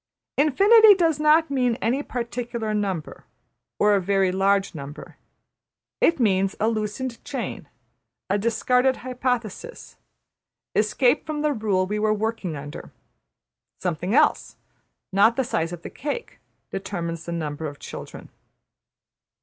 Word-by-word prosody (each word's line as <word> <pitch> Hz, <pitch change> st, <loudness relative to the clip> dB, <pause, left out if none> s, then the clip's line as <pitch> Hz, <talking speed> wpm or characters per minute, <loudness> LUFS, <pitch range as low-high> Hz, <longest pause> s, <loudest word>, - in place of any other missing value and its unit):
'' -, -, -66 dB
Infinity 415 Hz, -, +7 dB
does 330 Hz, -5 st, +1 dB
not 305 Hz, +1 st, +4 dB
mean 250 Hz, -4 st, +1 dB
any 240 Hz, +5 st, 0 dB
particular 235 Hz, -3 st, -4 dB
number, 195 Hz, -7 st, -3 dB, 0.5 s
or 210 Hz, 0 st, +4 dB
a 200 Hz, -, +3 dB
very 195 Hz, 0 st, +2 dB
large 195 Hz, +1 st, +1 dB
number. 145 Hz, -2 st, -9 dB, 0.8 s
It 330 Hz, -, +3 dB
means 195 Hz, -4 st, +2 dB
a 220 Hz, -, +2 dB
loosened 230 Hz, +3 st, -3 dB
chain, -, -, -5 dB, 0.6 s
a 200 Hz, +2 st, +1 dB
discarded 250 Hz, +4 st, +2 dB
hypothesis, 250 Hz, -, -4 dB, 0.8 s
escape 240 Hz, +7 st, +2 dB
from 300 Hz, -1 st, -3 dB
the 300 Hz, -1 st, +2 dB
rule 205 Hz, -6 st, 0 dB
we 210 Hz, +3 st, -2 dB
were 215 Hz, 0 st, +2 dB
working 215 Hz, -6 st, -3 dB
under. 145 Hz, 0 st, -8 dB, 0.9 s
Something 180 Hz, -, -2 dB
else, 300 Hz, +1 st, +2 dB, 0.6 s
not 205 Hz, +4 st, +4 dB
the 265 Hz, -, +1 dB
size 165 Hz, -9 st, -1 dB
of 175 Hz, -1 st, -8 dB
the -, -, -7 dB
cake, 300 Hz, -, -5 dB, 0.3 s
determines 170 Hz, -4 st, -4 dB
the 170 Hz, -, -5 dB
number 155 Hz, -2 st, -3 dB
of 145 Hz, -1 st, -8 dB
children. -, -, -9 dB
215 Hz, 130 wpm, -24 LUFS, 190-260 Hz, 0.9 s, Infinity